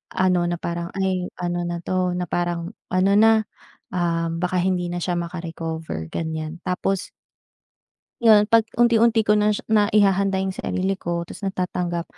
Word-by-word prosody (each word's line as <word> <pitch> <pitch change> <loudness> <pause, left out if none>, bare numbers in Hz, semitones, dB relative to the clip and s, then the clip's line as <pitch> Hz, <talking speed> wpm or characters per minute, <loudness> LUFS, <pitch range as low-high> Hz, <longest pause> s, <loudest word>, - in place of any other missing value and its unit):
ano 180 -2 +2
na 175 - 0
parang, 170 0 -4
"Ay 190 -2 0
ano 175 0 -2
na 170 0 -3
to," 185 -1 0
na 180 - -1
parang, 175 0 -2 0.2
"ano 185 +2 +2
na, 220 0 +5 0.5
ah, 170 -2 0
baka 180 +2 -1
hindi 180 -1 0
na 175 - -2
siya 175 0 -1
maka 170 +1 -4
recover." 160 - -5
Ganyan 160 0 -4
tapos 185 +1 -1 1.1
Yon 215 -3 +6
'pag 230 -1 +5
unti-unti 230 -1 +4
ko 210 - +3
na 210 0 +3
siya - - -6
naihahanda 200 -2 +3
yung 190 - -2
sarili 190 0 -2
ko 170 0 -3
tas - - -11
natatanggap, 180 -3 -2
180 Hz, 160 wpm, -23 LUFS, 170-195 Hz, 1.1 s, Yon